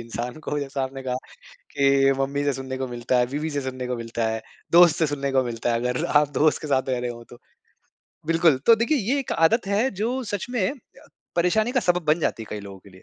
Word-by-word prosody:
इंसान 120 +4 -5
को। 150 - -1
जैसा 140 -1 -3
आपने 135 0 -5
कहा 125 -1 -2 0.6
कि, 135 -1 +3
मम्मी 140 +1 -1
से 145 -1 +1
सुनने 130 0 -5
को 130 -1 -3
मिलता 120 +1 -1
है, 125 - +3
बीवी 150 +3 -2
से 145 -1 -2
सुनने 130 -1 -5
को 125 - -2
मिलता 115 0 -3
है, 110 0 -3 0.3
दोस्त 170 -2 +7
से 160 - +2
सुनने 140 -1 -2
को 130 -1 +3
मिलता 120 -1 -2
है। 115 - +1
अगर 125 +1 -1
आप 145 -1 +3
दोस्त 155 0 +3
के 155 - -5
साथ 135 -1 +1
रह 125 -1 0
रहे 125 0 -3
हो 120 0 -8
तो। 120 - -13 0.9
बिल्कुल, 165 -3 +3
तो 230 - +8
देखिए 235 +6 +1
ये 245 +7 0
एक 265 - -4
आदत 195 +7 +2
है 210 +6 +1
जो 230 +7 -2
सच 205 -3 -4
में 245 -2 0 0.6
परेशानी 215 +7 +2
का 255 - +2
सबब 175 -3 +1
बन 150 +2 +3
जाती 115 - -1
है - - -10
कई 105 - -4
लोगों 100 -1 -10
के 100 - -18
लिए। 95 0 -17
140 Hz, 245 wpm, -24 LUFS, 125-175 Hz, 0.9 s, तो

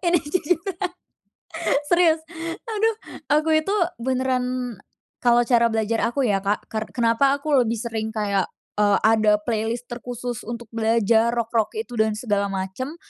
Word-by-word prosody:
Ini 345 0 +4
jujur 340 +2 +1 1.3
serius, 330 0 +3 0.4
aduh. 445 -1 0 0.3
Aku 305 +2 +3
itu 315 +6 +2 0.3
beneran 255 -2 -1 0.4
kalau 240 0 +4
cara 235 -1 +4
belajar 225 0 0
aku 270 +3 -1
ya, 200 -5 +2
Kak, 200 +2 -1
ker 220 -1 -3
kenapa 240 +4 +3
aku 300 +2 -4
lebih 230 -1 0
sering 220 -1 -3
kayak, 205 -3 -1 0.3
eee, 205 -1 +4
ada 215 -1 +5
playlist 230 +1 -2
terkhusus 245 -1 -6
untuk 235 0 -5
belajar 225 0 +3
rock-rock 230 - 0
itu 440 - -5
dan 220 -1 +2
segala 205 -3 0
macam. 195 - -4
235 Hz, 135 wpm, -23 LUFS, 220-265 Hz, 1.3 s, ada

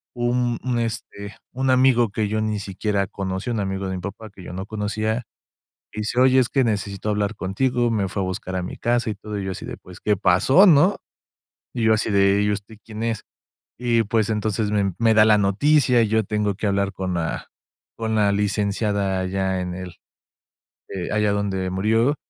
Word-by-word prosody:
un 120 0 0
un 125 -2 0
este, 105 -3 -5 0.2
un 130 +1 -1
amigo 130 -3 +4
que 105 -1 -1
yo 110 +1 -1
ni 105 -1 -1
siquiera 100 +1 -2
conocí, 95 +4 -4
un 115 -3 -1
amigo 95 -1 -2
de 95 - -3
mi 90 - -5
papá 105 +3 -7
que 95 -2 -14
yo 90 - -8
no 95 +2 -5
conocía. 110 +2 -2 0.7
Dice: 110 +4 -1
"Oye, 130 0 +5
es 125 -3 +3
que 135 +1 +2
necesito 100 -2 -2
hablar 105 +1 -1
contigo". 120 +5 0
Me 100 -4 0
fue 100 - -3
a - - 0
buscar 95 0 -4
a 90 - -1
mi 90 - -6
casa, 120 -1 0
y - - -3
todo. 105 +1 -6
Y 95 - -4
yo 95 - -3
así - - -8
de: - - -6
"pues 90 0 -14
¿Qué 105 -2 +1
pasó?", 120 - +5
¿no? 175 +4 +5 0.8
Y 115 -2 -1
yo 110 0 +5
así 110 0 -1
de: 100 0 +3
"¿y 105 - +1
usted 105 +2 -5
quién 110 0 -7
es?". 115 -2 -2 0.6
Y 120 -2 +2
pues, 110 0 0
entonces 105 -1 -1
me 100 -3 +1
me 115 -1 +3
da 110 0 +6
la 110 -1 +5
noticia. 125 +5 +3
Y 110 - +2
yo 110 +1 +2
tengo 105 -1 -1
que 105 - -2
hablar 100 0 0
con 95 -1 -3
la 85 -1 -3 0.5
con 110 -1 -2
la 105 -2 +3
Licenciada, 100 -1 0
allá 95 0 -1
en 90 -1 -4
el, 90 -2 -7 1.0
eh, 95 -3 -5
allá 105 -1 +2
donde 95 -2 -1
murió. 110 +9 +2
105 Hz, 205 wpm, -22 LUFS, 100-115 Hz, 1.0 s, da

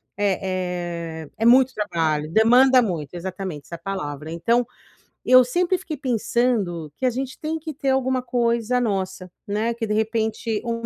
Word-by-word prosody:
é 180 -4 -2
é - - -16
é 225 - -1
muito 260 +2 +6
trabalho, 160 -7 -1
demanda 250 +5 +6
muito 175 -7 -3
exatamente, 180 -4 -6
essa 170 - -8
palavra. 160 -5 -5
Então, 230 +8 +1 0.6
eu 255 0 +9
sempre 355 +9 +1
fiquei 345 -4 -6
pensando 230 - -1
que - - -5
a 255 - +4
gente 260 +2 -4
tem 315 +1 -2
que 315 -1 -7
ter 275 0 -3
alguma 260 -1 +1
coisa 235 0 0
nossa, 190 -5 -2 0.2
né, 215 +3 -1
que, 230 -1 -4
de 210 - -2
repente 220 0 -1
o 235 -1 -1
220 Hz, 160 wpm, -23 LUFS, 180-250 Hz, 0.6 s, eu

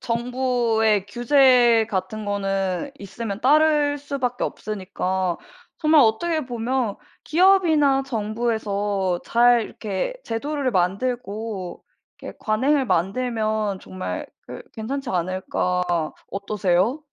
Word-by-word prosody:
정부의 235 -4 +1
규제 240 0 +4
같은 215 +2 -3
거는 195 +3 -2
있으면 200 +1 -6
따를 295 +1 +3
수밖에 270 -4 -3
없으니까 185 -3 -3 0.4
정말 310 -2 +5
어떻게 310 +8 +1
보면 240 -2 -2 0.3
'기업이나 320 -6 +4
정부에서 210 -5 -1
잘 240 0 +4
이렇게 210 - -4
제도를 275 +3 -2
만들고 200 0 -2 0.4
이렇게 - - -9
관행을 265 +6 +1
만들면 215 +1 0
정말 185 0 -5 0.2
그 - - -8
괜찮지 265 +4 -4
않을까.' 180 0 -1 0.5
어떠세요? 200 - 0
225 Hz, 240 characters per minute, -23 LUFS, 200-265 Hz, 0.5 s, 정말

